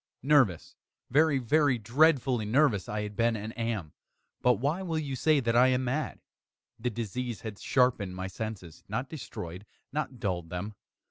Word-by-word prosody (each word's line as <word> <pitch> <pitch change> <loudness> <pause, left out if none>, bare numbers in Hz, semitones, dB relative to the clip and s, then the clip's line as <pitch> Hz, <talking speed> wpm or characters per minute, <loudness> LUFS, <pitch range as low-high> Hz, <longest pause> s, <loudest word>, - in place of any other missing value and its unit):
nervous 130 - +3 0.4
very, 150 +1 +4
very 135 +1 +3
dreadfully 130 +1 +3
nervous 110 -2 +2
I 105 0 -2
had 105 0 -6
been 115 +2 +2
and 110 +1 -6
am; 115 -9 -3 0.5
but 125 - +5
why 145 - -1
will 170 -4 -2
you 145 -4 -2
say 150 +4 +3
that 115 -1 0
I 125 +2 +7
am 130 0 +2
mad? 135 +5 -2 0.6
The 125 +2 -1
disease 120 +1 -4
had 110 -3 -7
sharpened 115 -8 +1
my 95 0 -4
senses 95 -4 -6
not 125 +6 -3
destroyed 90 - -7 0.3
not 140 -4 -3
dulled 90 -5 -2
them. 90 +5 -4
120 Hz, 160 wpm, -29 LUFS, 105-135 Hz, 0.6 s, I